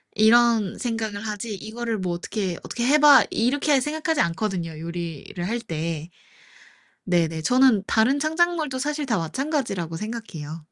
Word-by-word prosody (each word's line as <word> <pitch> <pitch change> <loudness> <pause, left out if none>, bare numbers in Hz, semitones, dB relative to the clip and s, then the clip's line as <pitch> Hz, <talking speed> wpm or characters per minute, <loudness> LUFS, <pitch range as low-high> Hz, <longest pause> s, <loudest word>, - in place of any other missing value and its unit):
이런 225 -2 +4
생각을 220 -4 -3
하지 210 +1 -4
이거를 225 +3 -4
뭐 185 -3 -2
어떻게, 185 +1 -3
'어떻게 235 - -3
해 285 +4 +5
봐.' 295 -2 +8
이렇게 275 +4 +1
생각하지 310 +2 -1
않거든요, 170 -2 -2
요리를 170 0 -6
할 230 +5 -1
때. 165 -5 -4 0.9
네네. 165 -3 0
저는 250 +1 +4
다른 240 +6 +3
창작물도 315 -3 0
사실 295 +2 -2
다 230 -5 0
마찬가지라고 195 - -2
생각해요. 170 -8 -6
220 Hz, 325 characters per minute, -24 LUFS, 175-265 Hz, 0.9 s, 봐